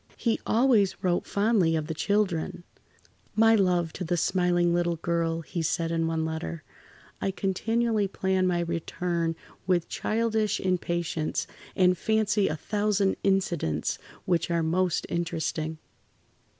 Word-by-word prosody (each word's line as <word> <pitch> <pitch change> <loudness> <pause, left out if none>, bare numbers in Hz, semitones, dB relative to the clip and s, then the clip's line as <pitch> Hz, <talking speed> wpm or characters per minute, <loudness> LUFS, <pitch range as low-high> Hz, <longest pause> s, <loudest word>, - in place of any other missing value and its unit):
He 230 -2 0
always 225 -5 +3
wrote 180 -1 +1
fondly 200 -6 +2
of 155 -1 -1
the 160 - -3
children: 185 -1 0 0.7
"My 225 +1 +6
love 180 -5 +2
to - - -5
the 175 +1 -1
smiling 175 -1 +2
little 175 0 +1
girl," 165 0 -1
he 170 +2 -4
said 165 +1 0
in 165 -1 0
one 160 -1 -1
letter. 160 0 -4 0.6
"I - - 0
continually 215 +3 0
plan 190 -1 0
my 175 -1 +1
return 170 0 -2 0.3
with 175 -3 +1
childish 220 -1 0
impatience, 170 -3 -1 0.3
and 180 -1 +4
fancy 210 0 +1
a 155 - -1
thousand 205 +2 +1
incidents 170 - 0 0.3
which 175 -1 +1
are 170 -1 +1
most 175 +2 +1
interesting." 160 -2 -2
175 Hz, 130 wpm, -27 LUFS, 165-200 Hz, 0.7 s, My